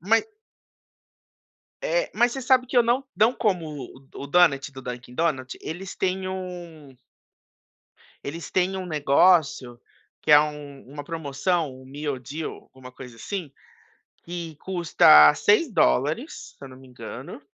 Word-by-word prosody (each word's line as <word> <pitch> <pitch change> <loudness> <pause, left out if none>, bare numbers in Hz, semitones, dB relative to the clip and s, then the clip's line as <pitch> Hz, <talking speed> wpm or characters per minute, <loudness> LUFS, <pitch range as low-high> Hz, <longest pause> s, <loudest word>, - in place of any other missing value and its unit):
mas 220 - +2 1.6
é - - 0
mas 240 0 +2
você 270 - -5
sabe 255 0 +3
que - - -6
eu - - +8
não, 245 +4 +1
não 220 +6 +3
como 185 -10 -1 0.2
o 135 +2 -14 0.2
o - - -7
Donut 145 -4 +3
do 130 0 -10
Dunkin´Donut? 130 +2 -3
Eles 185 +4 -7
têm 190 0 -2
um 175 -7 -8 1.3
eles 165 +4 -7
têm 185 +1 +1
um 185 - -5
negócio 145 -4 +2 0.4
que - - 0
é 145 - +9
u 150 -2 -5
uma 145 +1 -8
promoção, 160 +1 -2
um - - -15
meal 140 -1 -5
deal 150 +6 -6 0.2
alguma 130 -1 -13
coisa 125 -2 -12
assim, 170 - -6 0.7
que 170 -2 -7
custa 155 - +6
$6 205 - +1
se - - -15
eu - - -11
não 130 - -13
me 130 0 -16
engano, 125 +3 -9
155 Hz, 140 wpm, -24 LUFS, 135-185 Hz, 1.6 s, é